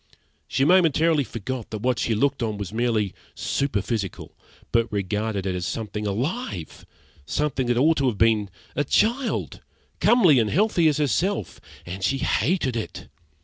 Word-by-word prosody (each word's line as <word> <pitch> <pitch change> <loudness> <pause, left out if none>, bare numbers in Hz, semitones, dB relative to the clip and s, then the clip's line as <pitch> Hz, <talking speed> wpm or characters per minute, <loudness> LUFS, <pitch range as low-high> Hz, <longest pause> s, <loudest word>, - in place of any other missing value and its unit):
She 135 - +1
momentarily 165 -3 +4
forgot 120 +1 -5
that 110 -1 -6
what 125 -1 +1
she 115 - 0
looked 135 +4 +1
on 110 -3 -1
was 100 0 -6
merely 110 -4 0 0.2
superphysical, 105 -6 -2 0.4
but 115 -1 +1
regarded 105 0 -2
it 95 - -1
as 90 0 -3
something 105 -1 -4
alive, 125 - -4 0.4
something 140 -4 -1
that 120 -1 +1
ought 155 +5 +4
to 135 - +2
have 115 -5 -1
been 110 -2 +3 0.3
a 145 - +1
child, 235 - 0 0.4
comely 180 - +5
and 110 -2 +1
healthy 180 - +3
as 150 -2 +2
herself 155 - -1 0.2
and 95 +2 -6
she 135 +7 +1
hated 135 - 0
it. 115 - -5
120 Hz, 150 wpm, -24 LUFS, 105-150 Hz, 0.4 s, comely